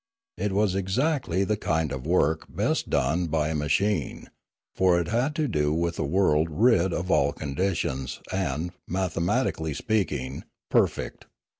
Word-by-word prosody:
It 100 +1 0
was 100 -1 +2
exactly 100 - 0
the 105 +2 +1
kind 80 -6 0
of 65 +1 -5
work 80 -3 +2
best - - -1
done 80 +7 +1
by 80 -1 0
a - - -1
ma 75 -1 -1
chine, 100 -5 0 0.4
for 90 -2 +3
it 85 - -2
had 125 +7 0
to 155 -2 0
do 75 - +1
with 85 +1 -1
a - - +1
world 80 0 +2
rid 95 +1 +3
of 90 +2 -2
all 70 +1 +3
conditions 70 -4 -2
and, 85 -2 -1 0.2
mathematically 85 -4 -1
speaking, 70 - -1 0.3
perfect. - - 0
85 Hz, 150 wpm, -26 LUFS, 75-95 Hz, 0.4 s, for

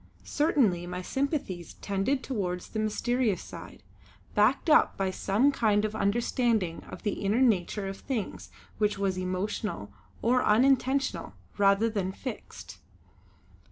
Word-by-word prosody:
Certainly 230 - +1
my 180 +1 -5
sympathies 265 - -3
tended 200 +7 -1
towards 180 -8 -3
the 220 - -4
mysterious 215 0 0
side, - - -11 0.5
backed 215 +10 +3
up 310 - +5
by 190 -1 0
some 210 +9 +2
kind 215 -5 +2
of 215 - -3
understanding 220 -3 0
of - - -9
the 205 -1 -2
inner 205 +4 +2
nature 205 -4 +1
of 195 0 -5
things 240 -7 -4 0.3
which 210 -2 +1
was 195 -1 0
emotional 185 - -3 0.3
or 250 +2 +3
unintentional 265 +4 +2 0.3
rather 200 +2 +4
than 200 -4 -2
fixed. 230 +3 -8
210 Hz, 125 wpm, -28 LUFS, 195-250 Hz, 0.5 s, up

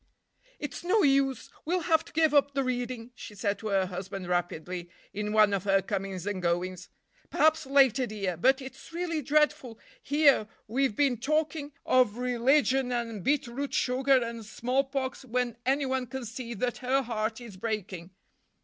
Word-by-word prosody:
"It's 295 +2 -6
no 390 +4 +3
use, 275 -3 +2
we'll 355 +3 0
have 320 -1 +2
to - - -14
give 315 -1 +2
up 285 -1 +3
the 275 - +1
reading," 245 -1 -3
she 210 - -10
said 205 0 -1
to 220 - -5
her 195 -2 +2
husband 185 +1 -6
rapidly, 175 0 -2 0.2
in 210 +1 -3
one 215 -1 +5
of 195 -2 0
her 195 -1 +4
comings 195 -2 -4
and 205 -2 -3
goings. 180 +1 -2 0.4
"Perhaps 315 -2 +2
later, 270 -2 +4
dear. 195 -5 -3
But 265 - +2
it's 265 - -11
really 335 -2 -2
dreadful, 285 -4 +1 0.2
here 285 - +4 0.2
we've 255 0 0
been 270 -2 +2
talking 300 +1 -1
of 250 -4 +3
religion 250 +1 +2
and 230 -5 -3
beet 290 +1 +2
root 270 +4 -4
sugar 260 0 +3
and 230 -1 -6
smallpox, 260 +4 -2
when 250 -1 -1
anyone 265 -2 +1
can 265 0 -6
see 235 +1 -6
that 245 +4 -2
her 265 +1 +1
heart 220 -1 -2
is 235 -5 -10
breaking." 190 -4 -4
250 Hz, 165 wpm, -28 LUFS, 210-275 Hz, 0.4 s, one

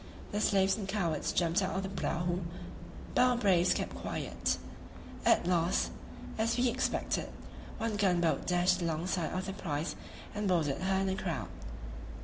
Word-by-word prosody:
The 210 - -1
slaves 195 -2 +3
and 200 -3 -4
cowards 190 -5 0
jumped 170 +2 +2
out 190 0 -1
of 190 - -1
the 190 - -3
prahu, 175 +1 0 0.7
but - - +4
our 250 -1 +5
braves 185 -6 +4
kept - - -2
quiet; - - -2 0.7
at - - +5
last, 175 -1 +2 0.5
as 230 +2 +2
we 245 0 +3
expected, - - -1 0.5
one 225 -2 -1
gun 190 -4 +3
boat 165 -2 +1
dashed 180 +1 +3
alongside 170 +1 -1
of 185 +1 -2
their 195 - -3
prize 155 -4 -3 0.4
and 210 0 -1
boarded 165 -5 +1
her 190 +1 +2
in 195 - +1
a 190 - 0
crowd. - - -3
185 Hz, 160 wpm, -32 LUFS, 175-200 Hz, 0.7 s, our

